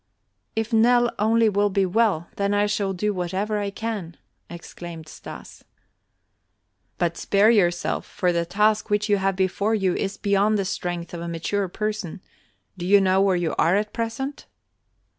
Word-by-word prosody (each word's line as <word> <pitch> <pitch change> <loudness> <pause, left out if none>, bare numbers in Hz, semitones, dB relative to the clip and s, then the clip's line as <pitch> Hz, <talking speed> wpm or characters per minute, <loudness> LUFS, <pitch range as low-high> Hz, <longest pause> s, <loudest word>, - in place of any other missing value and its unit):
"If 225 +1 -2
Nell 240 +2 +4
only 225 +2 +3
will 205 0 +2
be 195 0 +1
well, 185 -4 +1
then 200 0 +1
I 205 0 +3
shall 205 -1 -1
do 205 +3 -1
whatever 195 +4 -2
I 200 -1 -2
can," 200 -5 -5 0.3
exclaimed 170 -1 -9
Stas. - - -11 1.3
"But 170 -1 -1
spare 205 +3 +3
yourself, 175 -6 +1
for 180 -1 0
the 170 0 +1
task 210 +5 +1
which 210 +1 0
you 205 - +4
have 195 0 0
before 195 +3 0
you 190 -4 +1
is 195 +2 -3
beyond 205 +1 +2
the 195 - -1
strength 175 -2 -4
of 170 - -5
a 170 - -5
mature 180 +4 -2
person. 210 -2 -4 0.6
Do 175 - -3
you 200 +1 +6
know 190 0 +3
where 195 -1 +3
you 175 -2 -1
are 170 +4 +4
at 210 +1 -1
present?" 235 +5 -4
200 Hz, 165 wpm, -24 LUFS, 180-215 Hz, 1.3 s, you